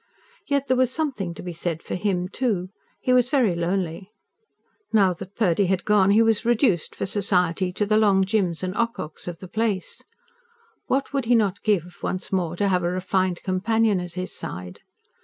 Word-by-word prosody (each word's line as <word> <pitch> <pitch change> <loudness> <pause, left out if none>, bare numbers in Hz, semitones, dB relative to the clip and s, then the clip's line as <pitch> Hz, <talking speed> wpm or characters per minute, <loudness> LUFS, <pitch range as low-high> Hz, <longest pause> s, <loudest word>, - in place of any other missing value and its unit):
Yet 280 -1 +1
there 260 -2 +1
was 255 -1 +3
something 255 - -2
to - - -9
be 180 -1 -5
said 165 -1 -3
for - - -6
him, 180 -1 -1
too. 200 -4 -1 0.3
He 255 - +2
was 250 -1 +4
very 255 - +3
lonely. 175 +1 -2 0.8
Now 195 -4 +4
that 190 +2 -10
Purdy 195 -3 +2
had 190 0 0
gone 205 -2 +4
he 215 +3 +5
was 225 -1 +2
reduced, 230 - +2
for - - -2
society, 185 -2 +1
to 210 - 0
the 215 +1 +2
Long 200 -3 +4
Jims 190 -4 0
and 185 0 -2
Ococks 230 -9 -3
of 175 -1 -5
the 185 - -10
place. 215 -2 -2 0.9
What 270 +2 0
would 275 -3 0
he 240 +1 +4
not 205 -4 +1
give, 180 -5 0
once 185 - -3
more 175 -3 0
to 200 +3 +1
have 180 -2 +2
a 175 - +1
refined 185 0 -1
companion 210 +2 +1
at 180 -1 -6
his 185 +1 -5
side? 90 +1 -7
195 Hz, 190 wpm, -24 LUFS, 180-225 Hz, 0.9 s, he